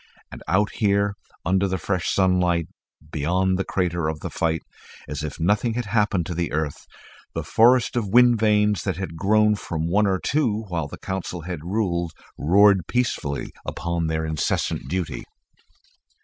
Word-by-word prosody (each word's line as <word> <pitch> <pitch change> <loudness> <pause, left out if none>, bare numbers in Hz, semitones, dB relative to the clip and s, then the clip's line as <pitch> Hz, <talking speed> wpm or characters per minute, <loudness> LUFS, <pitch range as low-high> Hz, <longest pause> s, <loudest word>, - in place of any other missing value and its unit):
And - - -9
out 100 +5 +2
here, 100 -1 +1 0.3
under 95 +1 +2
the 95 0 -1
fresh 90 0 -2
sunlight, 90 -3 +2 0.4
beyond 90 +5 +1
the - - +1
crater 85 -4 -1
of 80 -1 -3
the - - -5
fight, 80 -1 -1 0.4
as 75 0 -4
if 75 0 -5
nothing 105 +7 +1
had 125 -1 -2
happened 105 -4 +1
to 85 - -4
the 85 -1 -2
earth, 75 -2 -3 0.5
the - - -2
forest 120 +2 +4
of 115 -4 0
wind 120 +1 +5
vanes 105 -1 +3
that 95 -4 -2
had 95 -4 -5
grown 105 +4 +3
from 85 -5 -3
one 100 +4 +3
or 95 -1 +2
two 115 -2 0
while 85 -4 -2
the - - -9
Council 95 -2 -4
had 85 -2 -6
ruled, 85 -3 -1 0.2
roared 95 +4 +4
peacefully 115 - -1
upon 85 -1 -2
their 80 0 -1
incessant 80 -4 -1
duty. 90 0 -3
95 Hz, 165 wpm, -23 LUFS, 85-105 Hz, 0.5 s, wind